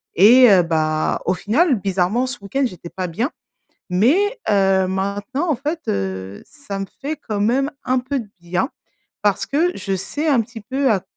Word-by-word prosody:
et 240 +6 +8
heu, 185 -2 +6
bah, 155 -2 0
au 185 - +2
final, 265 - +2
bizarrement, 195 +6 0
ce 255 -1 -5
week-end 270 +8 -1
j'étais 180 -7 -6
pas 185 0 -4
bien, 225 - -2 0.6
mais, 335 - +2
heu 190 -2 +3
maintenant, 205 - -2
en 290 - +2
fait, 300 +6 -3
heu, 95 0 -3
ça 285 -10 -7
me 195 - -2 0.2
fait 295 +2 -3
quand 210 -3 -1
même 265 +7 +1
un 255 +1 +1
peu 265 +2 -2
de 220 -4 -8
bien, 180 +7 -1 0.5
parce 200 -1 +1
que 320 +6 +2
je 195 -1 -2
sais 240 - -3
un 275 -6 +4
petit 225 0 -9
peu 265 +3 0
à 195 -4 0
210 Hz, 185 wpm, -20 LUFS, 190-270 Hz, 0.6 s, et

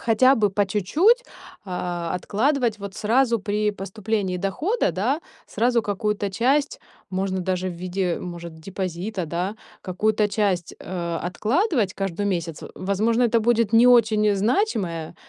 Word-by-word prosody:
хотя 255 +4 +5
бы 210 -4 +2
по 200 +1 +1
чуть-чуть, 315 - +3 0.4
а, 175 -2 -3
откладывать 230 +4 0
вот 200 -1 -7
сразу 235 +2 +2
при 210 0 0
поступлении 200 -1 -3
дохода, 305 - 0
да. 255 - 0 0.3
Сразу 235 0 +1
какую-то 205 0 -1
часть, 270 +8 +1 0.3
можно 190 0 -1
даже 185 0 -1
в - - -4
виде, 180 0 -2
может, 170 -2 -7
депозита, 185 +2 -4
да, 175 +6 -2 0.3
какую-то 210 +3 +1
часть, 200 -4 -1
э, 170 -2 -3
откладывать 225 - 0
каждый 195 0 -3
месяц. 170 -5 -2
В - - -8 0.2
возможно, 225 +5 +2
это 235 0 +3
будет 230 -1 +2
не 230 +2 +6
очень 215 -4 +4
значимое, 195 - 0
205 Hz, 135 wpm, -23 LUFS, 185-230 Hz, 0.4 s, не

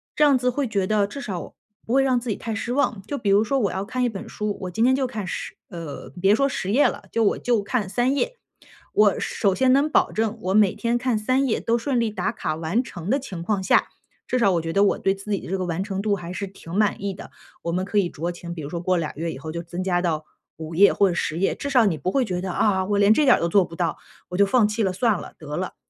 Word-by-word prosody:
这 300 - +3
样 285 -2 +6
子 250 0 +1
会 270 +1 -1
觉 195 -3 0
得 210 -2 +2
至 280 +8 -7
少 190 -9 -5 0.3
不 230 - -2
会 270 - +5
让 260 -2 +2
自 240 -2 -4
己 - - -1
太 225 -2 -4
失 240 +2 -3
望。 255 -7 0
就 285 +7 -4
比 205 -4 -1
如 200 +2 +5
说 270 +5 0
我 205 -5 +1
要 190 +1 -3
看 250 +3 -2
一 245 - +2
本 200 -4 -7
书， 210 -1 -3
我 180 -1 -4
今 220 +5 0
天 260 +1 +5
就 270 - 0
看 215 -6 -5
10 - - -5 0.2
呃， 165 -6 -7
别 195 +3 +4
说 275 +5 +2
10 195 -5 -3
页 280 +6 +5
了， - - -4
就 230 - +1
我 205 - +2
就 235 -4 +1
看 205 0 -1
3 245 +7 +1
页。 - - -1 0.5
我 210 -1 +4
首 200 -3 0
先 255 +5 +3
能 280 +3 +4
保 - - +3
证 225 0 -1
我 190 -1 -1
每 205 -2 +5
天 235 0 0
看 245 -2 0
3 255 +5 +1
页 220 - 0
都 230 +1 +1
顺 245 +1 0
利 230 -2 +1
打 200 +1 -2
卡 155 -7 -3
完 165 +10 0
成 175 -6 -7
的 275 - +2
情 190 -11 -7
况 200 +1 0
下， 185 - +3 0.4
至 255 - 0
少 205 -5 +4
我 170 - +1
觉 165 0 -4
得 200 +1 +4
我 200 - +3
对 195 - +1
自 195 +2 -8
己 200 - +1
的 - - -10
这 190 +2 -1
个 185 - -2
完 175 +2 -2
成 195 -1 -3
度 205 -1 +1
还 180 -1 -7
是 200 +1 -4
挺 175 -3 -11
满 210 -1 +1
意 200 -1 -2
的。 190 - -10 0.3
我 170 - -3
们 185 +2 -1
可 205 - -2
以 175 -3 +1
酌 170 +4 -4
情， 170 0 -8
比 165 - -7
如 - - -5
说 170 +1 -4
过 180 0 +1
2 155 -3 -2
月 165 +2 -3
以 135 - -7
后 155 +3 -7
就 170 +1 -4
增 175 +2 -5
加 175 -2 +1
到 155 -3 -1 0.3
5 160 0 -7
页 200 +4 +6
或 200 - +3
者 180 - 0
10 165 -1 -2
页， 195 - +1
至 280 - -4
少 250 -5 +4
你 165 -6 +1
不 185 - -1
会 265 -2 +2
觉 180 -4 -3
得， 185 -1 -3
啊， 190 0 +2
我 205 0 0
连 205 +1 +6
这 300 - +3
点 255 - +6
都 170 - 0
做 195 +3 +4
不 165 -1 -9
到， 170 -1 -1 0.3
我 180 - -5
就 200 - +5
放 225 +1 +3
弃 215 +2 -2
了 190 - +1
算 210 +2 +1
了， - - -10
得 150 -1 -7
了。 185 +2 -4
200 Hz, 300 characters per minute, -23 LUFS, 180-235 Hz, 0.5 s, 样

